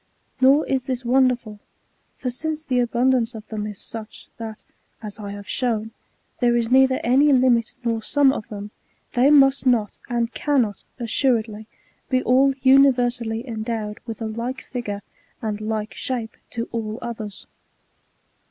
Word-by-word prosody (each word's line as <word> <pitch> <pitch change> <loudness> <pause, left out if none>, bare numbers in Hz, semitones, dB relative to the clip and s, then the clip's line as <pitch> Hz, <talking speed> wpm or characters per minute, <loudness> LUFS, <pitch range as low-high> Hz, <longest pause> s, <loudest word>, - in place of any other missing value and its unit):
Nor 275 +4 +5
is 260 -2 -1
this 255 -2 -3
wonderful; 245 -4 +2 0.6
for 250 - -3
since 310 +4 -4
the 255 -5 0
abund 245 +2 +2
ance 240 -2 0
of 220 -1 -10
them 210 -1 -3
is 210 -2 -7
such, 220 -1 -9
that, 220 -2 -7 0.4
as 210 0 -7
I 205 -1 -6
have 205 0 -9
shown, 225 -3 -1 0.5
there 240 -1 +3
is 235 0 -1
neither 260 0 +5
any 275 +5 +4
limit 250 -3 +3
nor 230 -1 0
sum 275 +3 +3
of 215 - -5
them, 205 0 -7 0.4
they 250 +3 +4
must 275 -2 +5
not, 225 -5 +1
and 235 -1 -1
cannot, 250 -9 0
assured 240 -1 +1
ly, 215 0 -10 0.4
be 255 -1 +2
all 265 +2 +4
universally 245 -3 +3
endowed 220 -2 -4
with 225 -1 -5
a - - -2
like 235 +4 -4
figure 205 -5 -5 0.4
and 215 -1 -3
like 215 0 -3
shape 240 -4 -4
to 230 -1 -4
all 220 -1 -3
others. 215 -4 -7
235 Hz, 155 wpm, -23 LUFS, 220-260 Hz, 0.6 s, Nor